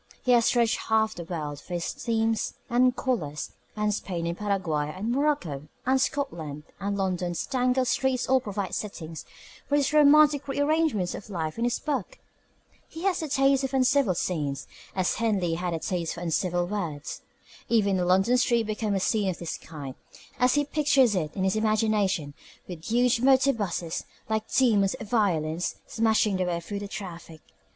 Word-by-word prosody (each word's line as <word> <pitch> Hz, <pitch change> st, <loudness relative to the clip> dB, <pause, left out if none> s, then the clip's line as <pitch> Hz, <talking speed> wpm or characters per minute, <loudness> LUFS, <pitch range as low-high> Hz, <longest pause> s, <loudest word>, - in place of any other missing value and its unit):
He 250 Hz, -, +2 dB
has 235 Hz, -2 st, +5 dB
dredged 235 Hz, -2 st, +2 dB
half 220 Hz, 0 st, +2 dB
the 175 Hz, -, -7 dB
world 150 Hz, -4 st, -4 dB
for 175 Hz, -, -6 dB
his 170 Hz, -, -2 dB
themes 225 Hz, -1 st, -1 dB, 0.2 s
and 250 Hz, +1 st, +4 dB
colours, 150 Hz, -, -2 dB, 0.2 s
and 210 Hz, 0 st, 0 dB
Spain 175 Hz, -4 st, -3 dB
and 170 Hz, 0 st, -2 dB
Paraguay 175 Hz, -8 st, -1 dB
and 205 Hz, +7 st, -3 dB
Morocco 245 Hz, -, 0 dB, 0.2 s
and 260 Hz, +1 st, +3 dB
Scotland 165 Hz, -, -2 dB, 0.2 s
and 200 Hz, +1 st, -2 dB
London's 180 Hz, -3 st, -1 dB
tangled 255 Hz, -1 st, +1 dB
streets 265 Hz, -1 st, +1 dB
all 260 Hz, 0 st, +4 dB
provide 200 Hz, -4 st, -4 dB
settings 165 Hz, -6 st, -5 dB, 0.4 s
for 285 Hz, -, +3 dB
his 285 Hz, 0 st, +1 dB
romantic 300 Hz, -1 st, +6 dB
rearrangements 285 Hz, -, +1 dB
of 205 Hz, -, -8 dB
life 165 Hz, 0 st, -3 dB
in 235 Hz, -, +1 dB
this 240 Hz, -, +1 dB
book. 305 Hz, -, -3 dB, 0.7 s
He 325 Hz, -, -9 dB
has 385 Hz, -3 st, +1 dB
a 315 Hz, -, -3 dB
taste 275 Hz, 0 st, +3 dB
for 265 Hz, -, -5 dB
uncivil 260 Hz, -6 st, +3 dB
scenes, 145 Hz, -6 st, -2 dB, 0.3 s
as 185 Hz, -2 st, 0 dB
Henley 205 Hz, -7 st, +1 dB
had 175 Hz, 0 st, -2 dB
a -, -, -1 dB
taste 170 Hz, 0 st, -2 dB
for 170 Hz, -, -8 dB
uncivil 175 Hz, +1 st, 0 dB
words. 170 Hz, -7 st, -4 dB, 0.5 s
Even 200 Hz, -5 st, +3 dB
a -, -, +1 dB
London 190 Hz, +7 st, +4 dB
street 235 Hz, -2 st, +2 dB
becomes 210 Hz, -1 st, -1 dB
a -, -, +2 dB
scene 210 Hz, -3 st, +1 dB
of 180 Hz, -, -3 dB
this 170 Hz, -, -4 dB
kind 145 Hz, -5 st, -8 dB, 0.5 s
as 250 Hz, +1 st, +4 dB
he 290 Hz, 0 st, +2 dB
pictures 280 Hz, -5 st, +3 dB
it 155 Hz, -5 st, -2 dB
in 190 Hz, -, -1 dB
his 190 Hz, +1 st, +1 dB
imagination 215 Hz, -8 st, +1 dB, 0.3 s
with 170 Hz, -2 st, -8 dB
huge 240 Hz, +1 st, +2 dB
motorbuses, 235 Hz, -11 st, +2 dB, 0.2 s
like 220 Hz, 0 st, -2 dB
demons 210 Hz, -7 st, +3 dB
of 215 Hz, -3 st, -9 dB
violence, 175 Hz, -7 st, +1 dB
smashing 220 Hz, -3 st, +2 dB
their 185 Hz, -1 st, 0 dB
way 170 Hz, -1 st, -1 dB
through 200 Hz, +4 st, -5 dB
the 205 Hz, -, -5 dB
traffic. 170 Hz, -6 st, -8 dB
210 Hz, 175 wpm, -27 LUFS, 175-250 Hz, 0.7 s, romantic